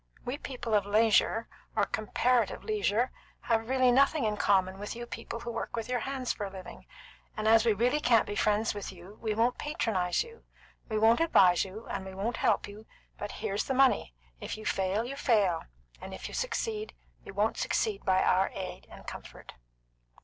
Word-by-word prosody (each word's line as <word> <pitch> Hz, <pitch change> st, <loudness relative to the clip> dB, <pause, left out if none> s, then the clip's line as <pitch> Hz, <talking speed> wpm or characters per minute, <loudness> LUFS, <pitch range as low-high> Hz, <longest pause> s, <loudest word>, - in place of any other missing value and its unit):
We 255 Hz, +4 st, -3 dB
people 245 Hz, -4 st, -5 dB
of 205 Hz, -1 st, +3 dB
leisure, 220 Hz, +1 st, +3 dB, 0.3 s
or 210 Hz, -2 st, +3 dB
comparative 235 Hz, +4 st, 0 dB
leisure, 255 Hz, -, +1 dB, 0.3 s
have 225 Hz, 0 st, 0 dB
really 255 Hz, -1 st, +4 dB
nothing 275 Hz, +3 st, +4 dB
in 210 Hz, -1 st, 0 dB
common 190 Hz, -2 st, +2 dB
with 205 Hz, +2 st, -5 dB
you 240 Hz, 0 st, -6 dB
people 230 Hz, +1 st, -7 dB
who 235 Hz, -, -5 dB
work -, -, -4 dB
with 230 Hz, -2 st, -3 dB
your 250 Hz, -1 st, 0 dB
hands 260 Hz, 0 st, -2 dB
for 210 Hz, -, -6 dB
a -, -, -5 dB
living; 190 Hz, -2 st, -10 dB, 0.5 s
and 215 Hz, 0 st, -1 dB
as 225 Hz, +1 st, +5 dB
we 225 Hz, -, +5 dB
really 245 Hz, +8 st, +2 dB
can't 235 Hz, -6 st, +4 dB
be 205 Hz, -, -5 dB
friends 210 Hz, +2 st, +1 dB
with 205 Hz, -2 st, -6 dB
you, 190 Hz, +3 st, -13 dB
we 220 Hz, -2 st, -1 dB
won't 235 Hz, +3 st, +1 dB
patronise 215 Hz, -, 0 dB
you. 465 Hz, 0 st, -15 dB, 0.5 s
We 215 Hz, -, -1 dB
won't 225 Hz, +2 st, +5 dB
advise 190 Hz, -, +5 dB
you, 200 Hz, +4 st, -8 dB
and -, -, -4 dB
we 190 Hz, 0 st, -8 dB
won't 220 Hz, +5 st, -2 dB
help -, -, +1 dB
you; 210 Hz, +2 st, -12 dB, 0.3 s
but 205 Hz, -, -4 dB
here's 210 Hz, -1 st, -2 dB
the 265 Hz, -, -1 dB
money. 260 Hz, -, +3 dB, 0.2 s
If -, -, -5 dB
you 215 Hz, -, -10 dB
fail, 195 Hz, +4 st, 0 dB
you 270 Hz, +3 st, -5 dB
fail; 205 Hz, -11 st, +2 dB, 0.4 s
and 190 Hz, 0 st, -7 dB
if -, -, -7 dB
you -, -, -10 dB
succeed, 440 Hz, -3 st, -3 dB, 0.3 s
you 195 Hz, -, -10 dB
won't 210 Hz, +2 st, +1 dB
succeed 425 Hz, -3 st, 0 dB
by 190 Hz, -1 st, +3 dB
our 190 Hz, +1 st, +3 dB
aid 185 Hz, -1 st, -6 dB
and -, -, -13 dB
comfort.'" -, -, -10 dB
220 Hz, 195 wpm, -30 LUFS, 200-250 Hz, 0.5 s, as